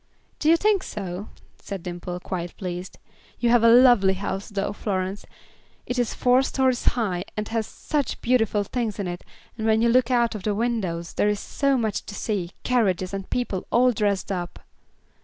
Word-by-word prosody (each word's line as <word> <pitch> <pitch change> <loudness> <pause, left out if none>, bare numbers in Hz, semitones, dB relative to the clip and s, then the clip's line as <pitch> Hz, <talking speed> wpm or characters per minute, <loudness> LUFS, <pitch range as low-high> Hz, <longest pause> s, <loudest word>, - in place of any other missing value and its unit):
"Do 310 - +2
you 335 - +6
think 410 +1 +2
so?" 195 - -6 0.3
said 195 -4 -7
Dimple, 175 0 -5
quite 175 -2 -5
pleased. 180 -1 -6 0.4
"You 240 -1 +2
have 240 -1 +5
a 230 - +7
lovely 235 -6 +6
house, 195 +1 -4
though, 205 -1 -2
Florence; 195 -1 -3 0.6
it 250 0 -2
is 240 -2 0
four 250 +1 +4
stories 260 -2 +1
high, 185 -7 -1
and 210 0 -3
has 225 -2 -1
such 290 -5 -2
beautiful 225 -4 +2
things 220 0 -3
in 200 -3 -3
it, 175 0 -5 0.4
and 220 - -1
when 220 0 +4
you 235 - +4
look 250 +1 +4
out 235 -2 +2
of 215 - -5
the 205 +2 -1
windows 200 -7 -2
there 205 - +2
is 210 -1 0
so 275 -1 0
much 220 -4 -1
to 205 - -7
see, 200 -6 -2
carriages, 195 -7 +1
and 195 -1 -5
people 225 -7 -2
all 250 +2 +5
dressed 205 -3 0
up." 175 -2 -4
210 Hz, 185 wpm, -24 LUFS, 190-240 Hz, 0.6 s, a